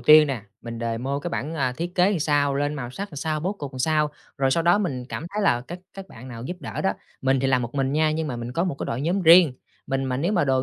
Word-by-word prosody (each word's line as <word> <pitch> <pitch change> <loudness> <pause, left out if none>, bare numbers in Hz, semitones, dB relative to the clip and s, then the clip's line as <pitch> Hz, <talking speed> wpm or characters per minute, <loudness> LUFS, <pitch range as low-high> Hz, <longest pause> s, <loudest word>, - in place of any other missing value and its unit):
tiên 150 +4 +8
nè, 130 -7 -3 0.2
mình 115 -1 -6
demo 120 +5 -2
cái - - -2
bảng, 155 +5 -3
à, 130 -4 0
thiết 175 +2 -4
kế 185 0 +3
sao, 145 -2 +2
lên 145 +1 0
màu 125 -4 -5
sắc 200 +9 -5
làm - - -8
sao, 155 +1 -1
bố 185 +5 -1
cục 145 -8 -7
làm 130 - -7
sao. 150 +1 +2 0.3
Rồi 135 -1 +2
sau 165 +4 +2
đó 175 +4 +4
mình 135 -11 -2
cảm 165 - -5
thấy 210 - 0
là 120 -11 +3
các 175 +8 -8 0.2
các 195 -1 -9
bạn 125 +3 -11
nào 115 -1 -7
giúp 180 +6 -4
đỡ - - -5
đó, 190 - +3 0.3
mình 135 -1 +2
thì 135 - +1
làm 130 -2 +2
một 120 +3 -5
mình 135 0 0
nha, 155 0 +3
nhưng 160 +1 -1
mà 125 - -3
mình 120 +1 -5
có 170 +6 +1
một 175 - -1
cái - - -3
đội 115 - -2
nhóm 175 +7 0
riêng. 165 -3 +8 0.3
Mình 135 0 -1
mà 130 -1 -1
nếu 170 +9 0
mà 175 -7 +3
đồ 130 -2 +2
145 Hz, 300 wpm, -24 LUFS, 130-165 Hz, 0.3 s, tiên